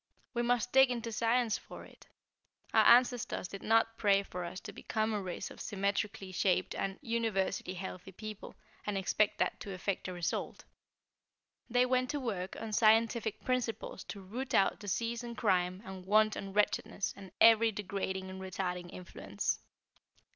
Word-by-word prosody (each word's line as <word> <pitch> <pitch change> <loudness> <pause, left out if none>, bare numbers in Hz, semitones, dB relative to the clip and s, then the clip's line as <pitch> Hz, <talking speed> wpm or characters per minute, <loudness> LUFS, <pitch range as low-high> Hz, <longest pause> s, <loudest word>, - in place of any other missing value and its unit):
We 240 - 0
must 245 0 +1
dig 265 0 +7
into 235 -2 -3
science 230 0 +1
for - - -11
it. - - -18 0.7
Our - - +6
ancestors 245 -5 +4
did 195 +2 -8
not 225 +1 +2
pray 200 -1 +4
for 180 -2 -6
us 180 +2 -6
to - - -8
become 220 0 -1
a 210 - -1
race 185 0 -5
of - - -10
symmetrically 200 -1 -2
shaped 185 0 +1
and 195 -1 -3
universally 220 -6 -1
healthy 185 0 -7
people, 215 +2 -8 0.3
and 205 -1 0
expect 205 +2 +1
that - - 0
to 200 - -7
effect 185 +1 -2
a 185 - -4
result. 175 -2 -3 1.1
They 245 +1 +4
went 255 0 +1
to 295 - -1
work 195 -8 -3
on 225 -1 -5
scientific 225 0 +3
principles 255 -3 -2
to 200 - -7
root 235 +8 -4
out 195 - +3
disease 230 +4 -2
and 235 -1 -7
crime 185 -2 +1
and 190 -2 -8
want 215 +3 +4
and 195 0 -6
wretchedness, 205 -1 +1
and 195 -2 -11
every 225 0 +7
degrading 190 -2 -3
and 190 0 -8
retarding 180 -1 -4
influence." 100 - -3
210 Hz, 160 wpm, -33 LUFS, 190-230 Hz, 1.1 s, dig